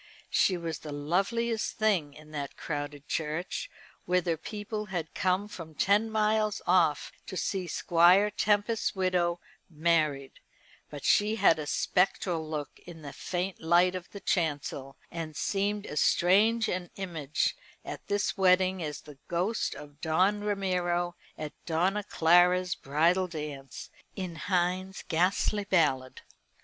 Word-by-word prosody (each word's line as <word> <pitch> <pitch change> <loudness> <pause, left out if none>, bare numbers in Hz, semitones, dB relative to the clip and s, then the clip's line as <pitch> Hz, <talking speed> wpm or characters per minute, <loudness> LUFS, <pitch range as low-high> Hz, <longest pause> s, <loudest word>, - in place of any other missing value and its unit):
She 185 - +3
was 165 -3 -4
the 150 - -8
loveliest 200 +10 -1
thing 185 -10 +1
in 155 0 -14
that 145 -2 -5
crowded 145 -2 -5
church, 160 +3 -3 0.4
whither 180 -2 +1
people 210 +5 -5
had 175 -5 -4
come 185 +2 0
from 165 -6 -10
ten 205 +6 +3
miles 215 -1 +1
off 170 -5 +2 0.2
to 185 - -5
see 185 -1 -2
Squire 175 +5 +4
Tempest's 210 +2 +1
widow 180 -2 +1 0.3
married; 155 -4 0 0.5
but 145 -2 -8
she 210 +1 +3
had 165 -7 +4
a 150 - -4
spectral 175 -2 0
look 150 -2 -5
in 165 -3 -12
the 140 - -7
faint 180 +1 -3
light 175 +3 +4
of 185 -1 -6
the 200 - -9
chancel, 145 -6 -2
and 165 -2 -5
seemed 205 +3 -1
as 150 - -1
strange 220 +6 +4
an 180 -1 -3
image 160 -7 -2 0.3
at - - -7
this 205 0 0
wedding 185 -1 +3
as 150 -3 -4
the 145 -2 -14
ghost 185 +6 -1
of 145 0 -12
Don 185 +6 +2
Ramiro 180 -4 0 0.2
at 150 -1 -5
Donna 185 +5 +1
Clara's 175 +1 +4
bridal 170 +7 +1
dance, 150 -5 -7 0.2
in 185 -3 -4
Heine's 185 +2 -1
ghastly 185 +4 +1
ballad. 140 -9 +1
175 Hz, 135 wpm, -29 LUFS, 155-195 Hz, 0.5 s, Squire